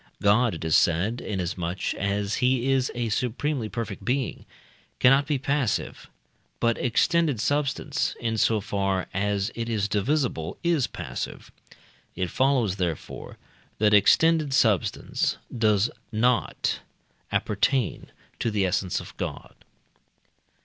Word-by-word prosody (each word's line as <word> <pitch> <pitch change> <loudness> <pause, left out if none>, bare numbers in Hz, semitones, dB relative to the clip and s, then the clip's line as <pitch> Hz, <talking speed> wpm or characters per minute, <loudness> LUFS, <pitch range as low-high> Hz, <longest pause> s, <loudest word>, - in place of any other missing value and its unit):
God, 105 +1 +3
it 80 - -6
is 80 - +3
said, 95 +8 +2
inasmuch 90 -2 -2
as 100 +1 -1
he 130 0 +2
is 135 -1 +1
a 120 -1 -1
supremely 125 +2 -1
perfect 105 -5 -5
being, 125 +3 -2 0.5
cannot 135 +3 +5
be 150 -2 +1
passive; 140 - -1 0.5
but 115 -1 +2
extended 150 +2 +2
substance, 145 +2 0
insofar 105 -4 0
as 100 +2 0
it 115 0 -4
is 105 -3 0
divisible, 105 - -1
is 170 -7 +2
passive. - - -6 0.6
It 90 -1 -2
follows, 130 -8 +2
therefore, 85 -5 -4 0.4
that 105 0 +3
extended 150 +7 +4
substance 110 -7 +1 0.2
does 110 -2 +2 0.2
not 120 +2 +1 0.5
appertain 110 +2 0 0.3
to - - 0
the 105 -3 +1
essence 95 0 0
of - - -12
God. - - -5
115 Hz, 115 wpm, -26 LUFS, 100-130 Hz, 0.6 s, cannot